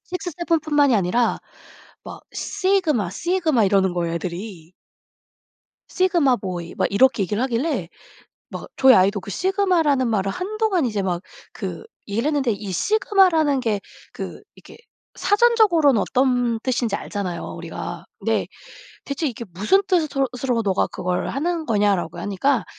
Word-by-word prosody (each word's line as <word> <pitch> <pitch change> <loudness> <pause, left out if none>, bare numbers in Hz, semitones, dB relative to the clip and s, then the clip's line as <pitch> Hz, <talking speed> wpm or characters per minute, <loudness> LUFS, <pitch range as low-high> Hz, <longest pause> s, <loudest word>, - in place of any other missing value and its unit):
6-7 345 -2 -2
뿐만이 290 -4 +3
아니라 220 +4 +1 0.7
막 - - -9
"sigma 370 - 0
sigma." 315 - +1
이러는 190 -2 +2
거예요 170 -1 -2
애들이. 175 0 -6 1.2
"sigma 345 -9 +2
boy." 175 -4 -6
막 - - +2
이렇게 215 0 +4
얘기를 205 +5 -2
하길래 245 - -1 0.6
막 - - -7
저희 265 -1 +7
아이도 195 +2 +4
그 195 +1 -10
sigma 380 - +1
라는 270 -4 +2
말을 195 -3 0
한동안 395 - -1
이제 210 -4 -1
막 180 -2 -2 0.3
그 - - -6 0.2
얘기를 225 +7 -1
했는데 275 -6 +1
이 205 -1 -5
sigma 390 - +3
라는 300 -5 +2
게 220 -5 -1 0.3
그 - - -7
이렇게 - - -15 0.4
사전적으로는 410 - +4
어떤 245 -3 +1
뜻인지 240 -4 -1
알잖아요 185 -6 -4 0.2
우리가. 170 +1 -7
"근데 225 +2 0 0.6
대체 285 +3 -3
이게 235 -2 -4
무슨 215 - +2
뜻으로 310 -7 +1 0.2
으로 240 -3 +1
너가 195 -2 +1
그걸 180 0 -2
하는 325 +4 -2
거냐?"라고 205 -6 +1
하니까 205 +2 0
245 Hz, 340 characters per minute, -22 LUFS, 195-325 Hz, 1.2 s, 저희